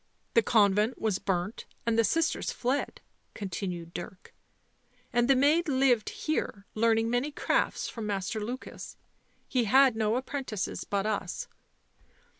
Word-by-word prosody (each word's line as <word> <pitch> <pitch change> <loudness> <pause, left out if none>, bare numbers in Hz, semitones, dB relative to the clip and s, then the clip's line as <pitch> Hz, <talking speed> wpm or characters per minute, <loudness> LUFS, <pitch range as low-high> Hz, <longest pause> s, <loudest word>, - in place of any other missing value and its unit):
The 230 - +6
convent 210 +1 +3
was 215 -4 0
burnt 185 +2 -2 0.2
and 230 -1 +2
the 230 - +4
sisters 325 +7 +1
fled," 255 +4 -2 0.3
continued 180 -3 -5
Dirk. 180 +1 -8 0.4
" - - -37
And 240 0 +3
the 270 - +5
maid 300 +6 +3
lived 260 -5 +3
here, 215 -9 -3
learning 225 0 +2
many 245 +4 +1
crafts 290 - 0
from 225 -3 -5
Master 205 +1 -2
Lukas. 245 +4 -7 0.5
He 250 -3 +1
had 260 +2 +5
no 220 0 +1
apprentices 255 -5 -3
but 200 0 -1
us." 200 -4 -2
225 Hz, 135 wpm, -29 LUFS, 200-260 Hz, 0.5 s, The